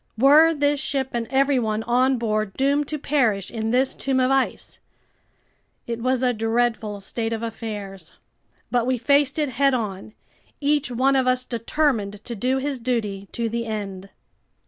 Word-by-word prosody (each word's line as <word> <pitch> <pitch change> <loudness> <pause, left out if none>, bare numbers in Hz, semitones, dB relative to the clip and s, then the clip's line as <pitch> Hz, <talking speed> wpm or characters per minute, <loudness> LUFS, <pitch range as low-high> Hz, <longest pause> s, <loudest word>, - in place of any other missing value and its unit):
Were 295 +7 +6
this 290 -2 +1
ship 270 -2 -1
and 235 -1 -3
everyone 255 -6 +1
on 255 +3 +2
board 215 -3 -1
doomed 280 +2 +1
to 305 - -3
perish 245 -10 0
in 225 -1 -3
this 255 +3 +2
tomb 265 -1 -1
of 255 +1 +2
ice? 270 -1 -1 1.1
It 235 -1 -4
was 255 +1 0
a 250 -1 +3
dreadful 225 -2 -1
state 225 +3 -3
of 225 0 -3
affairs. 205 -6 -6 0.6
But 245 -1 +1
we 255 -1 +1
faced 280 +4 +2
it 300 -3 0
head 270 +2 +2
on, 210 -3 -4 0.5
each 290 -2 +1
one 260 +3 +2
of 260 -1 +2
us 255 0 +1
determined 230 -4 -1
to 240 - -5
do 255 +5 0
his 270 0 -2
duty 210 -5 -2
to 235 -1 -1
the 230 +1 -3
end. 195 -3 -5
245 Hz, 165 wpm, -23 LUFS, 220-270 Hz, 1.1 s, Were